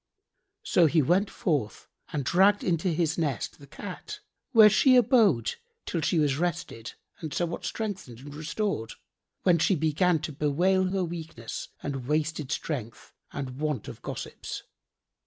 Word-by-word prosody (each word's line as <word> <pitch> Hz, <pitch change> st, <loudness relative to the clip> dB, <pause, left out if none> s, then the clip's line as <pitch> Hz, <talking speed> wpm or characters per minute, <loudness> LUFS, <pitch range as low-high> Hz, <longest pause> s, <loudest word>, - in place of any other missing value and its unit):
So 170 Hz, -, +4 dB
he 155 Hz, 0 st, +3 dB
went 185 Hz, +8 st, +2 dB
forth 140 Hz, -, -2 dB, 0.2 s
and 145 Hz, -4 st, -2 dB
dragged 195 Hz, +7 st, +4 dB
into 175 Hz, 0 st, +1 dB
his 165 Hz, -1 st, 0 dB
nest 140 Hz, -9 st, -2 dB
the 140 Hz, -, -14 dB
Cat, 205 Hz, -, -8 dB, 0.3 s
where 225 Hz, -4 st, +9 dB
she 255 Hz, +5 st, +5 dB
abode 220 Hz, -, +4 dB, 0.3 s
till 170 Hz, -, -2 dB
she 165 Hz, -, +1 dB
was 145 Hz, -3 st, +2 dB
rested 170 Hz, -9 st, -3 dB, 0.3 s
and 160 Hz, -3 st, -5 dB
somewhat 170 Hz, +3 st, -2 dB
strengthened 195 Hz, -, -4 dB
and 145 Hz, +1 st, -10 dB
restored, 155 Hz, -, -3 dB, 0.5 s
when 175 Hz, -3 st, +4 dB
she 190 Hz, -, +3 dB
began 160 Hz, +3 st, +2 dB
to 160 Hz, -, -4 dB
bewail 170 Hz, +7 st, +2 dB
her 185 Hz, 0 st, 0 dB
weakness 160 Hz, -9 st, -6 dB, 0.2 s
and 135 Hz, -3 st, -4 dB
wasted 150 Hz, -1 st, -1 dB
strength 120 Hz, -9 st, -4 dB, 0.2 s
and 135 Hz, -2 st, -5 dB
want 150 Hz, -3 st, -2 dB
of -, -, -9 dB
gossips. -, -, -6 dB
160 Hz, 145 wpm, -28 LUFS, 145-185 Hz, 0.5 s, where